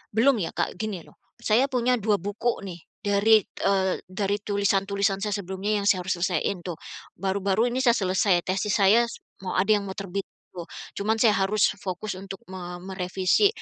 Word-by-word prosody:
belum 240 +1 +4
ya - - -3
Kak, - - -2
gini 205 -6 -3
loh, - - -21 0.2
saya 235 +5 +3
punya 250 -2 +1
2 210 0 +2
buku 205 +6 -2
nih 180 -3 -7 0.2
dari, 205 +1 +4
eee, 190 -1 0
dari 195 +2 -1
tulisan-tulisan 200 -1 +1
saya 210 -2 0
sebelumnya 200 +2 -2
yang - - -4
saya 185 -3 +3
harus 185 - +1
selesaiin 185 +1 0
tuh. 175 -3 -4 0.4
Baru-baru 195 +3 +1
ini 250 - -1
saya 235 -3 +5
selesai, 185 -2 +2
tesis 195 +3 0
saya 210 +4 +5
s - - -9 0.2
mau 185 - -3
ada 195 +4 +3
yang 205 -2 +2
mau 190 - -6
terbit 195 -1 -4 0.3
tuh. 175 -2 -8 0.3
Cuman 215 +2 +1
saya 225 - +6
harus 195 +1 +2
fokus 185 +2 -4
untuk 195 0 -8
me 180 -1 -6
merevisi. 190 - +2
200 Hz, 180 wpm, -26 LUFS, 190-215 Hz, 0.4 s, saya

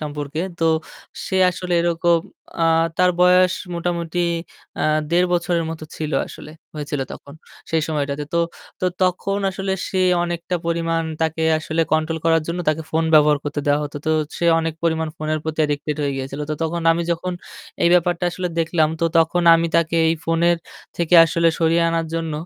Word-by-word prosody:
সম্পর্কে, 150 0 -4 0.2
তো 165 - 0 0.6
সে 190 - -1
আসলে 180 0 -5
এরকম, 170 0 +2 0.4
আ - - +2 0.3
তার 180 0 +4
বয়স 180 0 +5 0.2
মোটামুটি 170 0 -3 0.6
আ - - 0 0.3
১.৫ 180 +1 +3
বছরের 175 -1 0
মতো 160 -1 -7
ছিল 155 -1 -4
আসলে, 150 - -11 0.2
হয়েছিল 145 -1 -4
তখন, 140 - -11 0.4
সেই 160 -1 +1
সময়টাতে। 145 -1 -2
তো - - +3 0.4
তো - - -1 0.2
তখন 185 +2 0
আসলে 190 0 -3 0.2
সে 190 - -1 0.2
অনেকটা 175 +1 -3
পরিমাণ 165 0 0 0.2
তাকে 160 0 -1 0.2
আসলে 160 +1 -2
কন্ট্রোল 160 +1 +1
করার 165 -1 +3
জন্য 170 +1 -3
তাকে 155 +1 0
ফোন 160 +1 +1
ব্যবহার 150 -1 +5
করতে 145 0 -3
দেওয়া 145 0 +3
হতো। 145 0 -7
তো - - +2 0.3
সে - - -2
অনেক 165 -1 -2
পরিমাণ 160 -1 0
ফোনের 155 -1 -2
প্রতি 160 0 -4
অ্যাডিক্টেড 150 0 -1
হয়ে 140 -1 0
গিয়েছিল। 135 +2 -5
তো 155 - 0
তখন 165 +1 -2
আমি 170 +1 -1
যখন 175 +2 -2 0.5
এই - - +5
ব্যাপারটা 175 0 +1
আসলে 180 0 -3
দেখলাম 160 -1 +2
তো 165 - +4
তখন 165 +2 +2
আমি 165 0 +2
তাকে 165 0 +1
এই 165 - +2
ফোনের 170 +1 +2 0.4
থেকে 170 0 +1
আসলে 165 +1 +2
সরিয়ে 165 0 +3
আনার 165 -1 -1
জন্য 165 -1 -2
165 Hz, 175 wpm, -21 LUFS, 155-170 Hz, 0.6 s, বয়স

